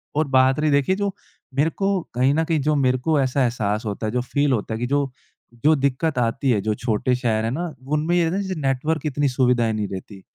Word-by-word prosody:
और 155 Hz, 0 st, +1 dB
बात 130 Hz, 0 st, +3 dB
रही 155 Hz, 0 st, +2 dB
देखिए 140 Hz, +6 st, +2 dB
जो 200 Hz, 0 st, -2 dB, 0.4 s
मेरे 145 Hz, +4 st, +3 dB
को 195 Hz, +2 st, 0 dB
कहीं 130 Hz, +3 st, +2 dB
न 160 Hz, +2 st, +2 dB
कहीं 160 Hz, -1 st, 0 dB
जो 150 Hz, +2 st, +1 dB
मेरे 130 Hz, -2 st, +2 dB
को 150 Hz, +4 st, +1 dB
ऐसा 135 Hz, +1 st, 0 dB
एहसास 110 Hz, -3 st, -1 dB
होता 105 Hz, +1 st, -3 dB
है 110 Hz, -, -2 dB
जो 125 Hz, -, 0 dB
फ़ील 140 Hz, +3 st, 0 dB
होता 110 Hz, -1 st, -2 dB
है 110 Hz, -, -3 dB
कि 120 Hz, -, -1 dB
जो 140 Hz, -1 st, 0 dB, 0.5 s
जो 155 Hz, +1 st, +6 dB
दिक्कत 140 Hz, +2 st, 0 dB
आती 125 Hz, +3 st, 0 dB
है 110 Hz, -, +2 dB
जो 110 Hz, +1 st, 0 dB
छोटे 120 Hz, +1 st, 0 dB
शहर 115 Hz, -3 st, 0 dB
हैं 115 Hz, -, -1 dB
ना 170 Hz, +5 st, -3 dB, 0.2 s
उनमें 155 Hz, +3 st, +1 dB
ये 175 Hz, -, +3 dB
रहता 165 Hz, +2 st, 0 dB
है 200 Hz, -, 0 dB
जैसे 190 Hz, -4 st, -4 dB
नेटवर्क 140 Hz, +4 st, -1 dB
इतनी 145 Hz, -1 st, 0 dB
सुविधाएँ 125 Hz, -3 st, +2 dB
नहीं 105 Hz, -2 st, -2 dB
रहती। 95 Hz, +1 st, -8 dB
135 Hz, 245 wpm, -22 LUFS, 120-155 Hz, 0.5 s, जो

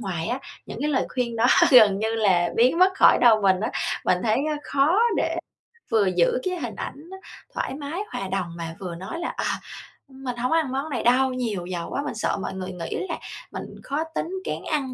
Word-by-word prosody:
ngoài 180 Hz, -6 st, -3 dB
á, 245 Hz, +3 st, -1 dB, 0.3 s
những -, -, -7 dB
cái 300 Hz, -, 0 dB
lời 260 Hz, -, +1 dB
khuyên 240 Hz, -2 st, -1 dB
đó 230 Hz, -, +3 dB, 0.2 s
gần 215 Hz, -6 st, +7 dB
như 220 Hz, +1 st, -1 dB
là 185 Hz, -6 st, +3 dB
biến 250 Hz, +8 st, +4 dB
mất 370 Hz, +1 st, +5 dB
khỏi -, -, +6 dB
đầu 220 Hz, -4 st, +6 dB
mình 190 Hz, -1 st, +3 dB
á. 220 Hz, -, -1 dB, 0.3 s
Mình 180 Hz, -, +3 dB
thấy 220 Hz, 0 st, +2 dB
á 300 Hz, -, -1 dB
khó 290 Hz, +8 st, +2 dB, 0.2 s
để -, -, 0 dB, 0.6 s
vừa 215 Hz, -3 st, +4 dB
giữ 175 Hz, +7 st, +3 dB
cái 365 Hz, -1 st, -2 dB
hình 240 Hz, -7 st, -5 dB
ảnh 300 Hz, +5 st, -7 dB, 0.4 s
thoải -, -, -3 dB
mái, 295 Hz, +6 st, -4 dB
hòa 195 Hz, -, -4 dB
đồng 185 Hz, -3 st, -3 dB
mà 165 Hz, -1 st, -6 dB
vừa 180 Hz, -3 st, -5 dB
nói 190 Hz, -, -6 dB
là 345 Hz, -, -2 dB
"Ờ, -, -, -1 dB, 0.6 s
mình 265 Hz, -2 st, -6 dB
hổ 250 Hz, +1 st, 0 dB
ng -, -, -4 dB
có 325 Hz, -, +4 dB
ăn 310 Hz, -5 st, 0 dB
món 275 Hz, +4 st, -2 dB
này 265 Hz, -, -2 dB
đâu, 255 Hz, +2 st, +3 dB
nhiều 220 Hz, -8 st, -3 dB
dầu 175 Hz, -2 st, -4 dB
quá." -, -, -2 dB
Mình 265 Hz, -, -4 dB
sợ 220 Hz, -, -1 dB
mọi -, -, -4 dB
người 190 Hz, 0 st, -5 dB
nghĩ 175 Hz, -2 st, -5 dB
là -, -, -2 dB, 0.3 s
mình -, -, -5 dB, 0.2 s
khó 290 Hz, +3 st, -2 dB
tính, -, -, -1 dB, 0.2 s
kén -, -, -4 dB
ăn 275 Hz, -4 st, -1 dB
235 Hz, 230 wpm, -24 LUFS, 190-275 Hz, 0.6 s, gần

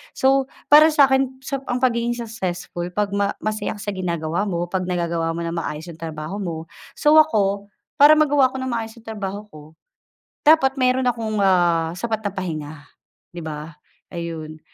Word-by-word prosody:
So 270 Hz, 0 st, +3 dB, 0.2 s
para 305 Hz, +1 st, +9 dB
sa’kin 265 Hz, -3 st, +2 dB
sop 275 Hz, 0 st, -5 dB
ang 250 Hz, +1 st, -2 dB
pagiging 235 Hz, -1 st, +1 dB
successful 185 Hz, -6 st, -4 dB
'pag 205 Hz, -1 st, 0 dB
ma 200 Hz, 0 st, 0 dB
masaya 215 Hz, 0 st, -2 dB
ka 205 Hz, -, -9 dB
sa 205 Hz, -, -2 dB
ginagawa 175 Hz, 0 st, -2 dB
mo, 175 Hz, -1 st, -3 dB
'pag 185 Hz, -1 st, -1 dB
nagagawa 170 Hz, -2 st, -1 dB
mo 170 Hz, -, -3 dB
ng 170 Hz, 0 st, -3 dB
maayos 160 Hz, +2 st, -5 dB
'yong 160 Hz, -, -14 dB
trabaho 160 Hz, +4 st, -6 dB
mo. 165 Hz, -4 st, -5 dB, 0.2 s
So 300 Hz, +1 st, +5 dB
ako, 200 Hz, -9 st, +2 dB, 0.3 s
para 295 Hz, +2 st, +9 dB
magawa 290 Hz, -3 st, +4 dB
ko 255 Hz, -, -12 dB
nang 260 Hz, -1 st, -3 dB
maayos 225 Hz, -1 st, -4 dB
'yong 225 Hz, -1 st, -10 dB
trabaho 205 Hz, -1 st, -5 dB
ko, 155 Hz, 0 st, -14 dB, 0.7 s
dapat 270 Hz, -4 st, +5 dB
mayro'n 255 Hz, 0 st, +2 dB
akong, 220 Hz, -3 st, -2 dB
ah, 175 Hz, -4 st, +3 dB
sapat 220 Hz, 0 st, -2 dB
na 205 Hz, -, -2 dB
pahinga 160 Hz, -6 st, -5 dB, 0.6 s
'di 175 Hz, -, -6 dB
ba, 155 Hz, 0 st, -7 dB, 0.4 s
ayun. 160 Hz, -2 st, -6 dB
200 Hz, 170 wpm, -22 LUFS, 170-255 Hz, 0.7 s, para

